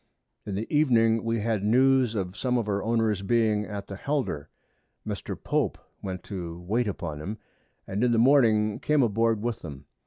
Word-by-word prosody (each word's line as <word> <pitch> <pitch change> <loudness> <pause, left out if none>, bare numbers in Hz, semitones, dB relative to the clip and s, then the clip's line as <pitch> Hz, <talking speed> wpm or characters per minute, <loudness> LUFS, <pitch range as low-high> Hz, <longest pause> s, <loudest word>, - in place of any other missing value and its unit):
In 100 - -3
the 105 +3 -2
Evening 115 -6 +3
we 115 -1 -1
had 110 -2 -1
News 130 +1 +3
of 95 -2 -3
some 125 +1 0
of 115 -3 -1
our 100 -1 0
Owners 110 -3 +1
being 110 0 +1
at 100 -2 -6
the 100 - -7
Helder: 110 - -2 0.6
Mr. - - -4
Pope - - -1 0.2
went 95 -2 -5
to 85 -4 -6
wait 110 +7 0
upon 80 -6 -4
'em, 105 +7 -5 0.5
and 100 +4 -2
in 125 - +3
the 115 - +2
Morning 115 -5 +4
came 150 -3 +2
aboard 115 -1 +1
with 120 -1 -2
them. 70 -3 -9
110 Hz, 180 wpm, -27 LUFS, 100-120 Hz, 0.6 s, Morning